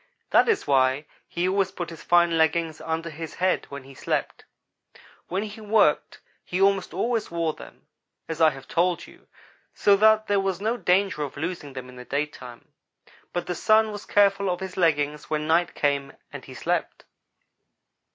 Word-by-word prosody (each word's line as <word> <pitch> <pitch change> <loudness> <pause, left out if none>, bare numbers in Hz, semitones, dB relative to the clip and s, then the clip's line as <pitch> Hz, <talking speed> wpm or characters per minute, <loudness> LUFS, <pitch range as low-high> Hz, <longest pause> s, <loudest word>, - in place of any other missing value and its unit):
That - - +5
is 430 -3 +1
why 135 +1 +2 0.2
he 175 +1 -1
always 195 0 +1
put 175 -3 -6
his 165 - -10
fine 175 -1 +3
leggings 160 0 +1
under 165 +1 -3
his 160 +1 -8
head 185 0 0
when 140 -1 -8
he 135 +1 -14
slept. - - -3 0.8
When 190 +3 -2
he 215 +1 -8
worked 210 -8 +2 0.2
he 180 - -3
almost 195 -1 +2
always 230 -2 -1
wore 165 -2 -1
them, - - -14 0.4
as 160 0 -4
I 160 - +7
have 135 -2 -10
told 175 0 0
you, - - -18 0.5
so 200 - +4
that 215 +1 +5
there 205 -1 +2
was 195 -2 -1
no 220 +4 0
danger 190 -6 +1
of 145 -2 -5
losing 160 -2 -5
them 130 -1 -7
in 125 0 -13
the 125 - -8
daytime; 140 -4 -5 0.6
but 175 - -3
the 180 - -2
Sun 215 +4 +3
was 205 0 -8
careful 200 -1 +3
of 180 -1 -1
his 190 -1 -6
leggings 150 -4 0
when 150 -1 -1
night 165 +2 +2
came 140 -1 0 0.2
and - - -8
he - - -11
slept. - - -2
170 Hz, 180 wpm, -25 LUFS, 150-195 Hz, 0.8 s, I